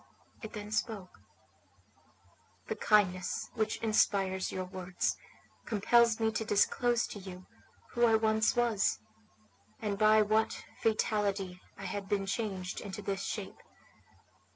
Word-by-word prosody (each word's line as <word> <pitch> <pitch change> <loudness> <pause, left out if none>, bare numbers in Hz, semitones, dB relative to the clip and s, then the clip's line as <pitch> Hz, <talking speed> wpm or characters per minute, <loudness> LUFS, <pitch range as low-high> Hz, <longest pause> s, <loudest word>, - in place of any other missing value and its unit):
It 220 -3 -8
then 210 -1 -7
spoke: 215 -4 -3 1.5
"The - - -1
kindness 185 -4 +1
which 220 -2 -1
inspires 195 -4 +2
your 185 -1 -3
words 185 -1 -2 0.5
compels 230 +1 +4
me 225 0 +2
to 220 - -2
disclose 235 +3 +2
to 205 - -8
you 185 -1 -9 0.5
who 240 -1 +3
I 225 - +4
once 220 0 +2
was, 235 - +2 0.8
and 205 -2 -2
by 215 0 +6
what 215 +1 0
fatality 200 -4 0 0.2
I 195 - -8
have 195 +1 -4
been 200 -1 0
changed 195 -3 -3
into 205 0 -7
this 195 0 -2
shape. - - -5
210 Hz, 125 wpm, -32 LUFS, 195-220 Hz, 1.5 s, by